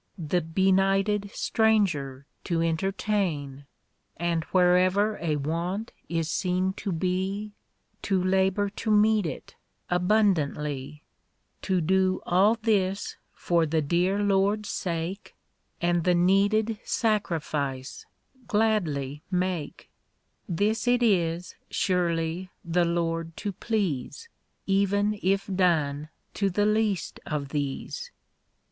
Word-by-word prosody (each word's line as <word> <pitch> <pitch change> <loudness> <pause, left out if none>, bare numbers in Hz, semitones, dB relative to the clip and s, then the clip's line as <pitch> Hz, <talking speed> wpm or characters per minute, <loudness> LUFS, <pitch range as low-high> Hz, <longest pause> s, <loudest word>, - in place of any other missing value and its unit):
The 175 +1 0
bcni. 195 +3 +2
Ljhtccl 205 -1 -1
strang^er 185 - +1 0.2
to 170 -3 0
entertain, 165 -4 -1 0.5
Aiul 170 -1 0
wlierever 185 +3 +3
a 160 -3 0
want 170 +9 -2 0.2
is 165 -2 -1
seen 185 +2 0
to 200 - -5
he, 190 +4 -1 0.5
To 190 -2 0
labor 190 +2 +2
to 220 +2 -5
meet 215 -2 +4
it 150 - -7 0.4
abimdantly‚ÄĒ 150 -7 +1 0.6
To 185 -2 0
do 185 +2 +2
all 195 +6 +4
this 195 -3 0 0.2
for 170 -2 +1
the 155 0 +1
dear 175 +6 +1
Lord's 205 +1 +1
sake, 175 +2 -4 0.4
And 175 -1 +1
the 180 +1 +3
needed 205 +5 +2
sacrifice 155 - -2 0.4
gladly 165 - 0
make, 180 -4 -3 0.6
This 210 +7 0
it 245 0 +3
is, 175 -5 +1 0.2
surely, 175 -1 0 0.2
the 170 +1 +2
Lord 165 -1 -2
to 205 - -3
please, 205 - -3 0.4
F.vcn 200 +1 +1
if 195 +1 +1
done 155 -6 +1 0.2
to 200 -1 0
the 205 +3 +1
least 210 -3 0
of 145 -2 -3
these. 145 - -4
185 Hz, 105 wpm, -27 LUFS, 165-205 Hz, 0.6 s, meet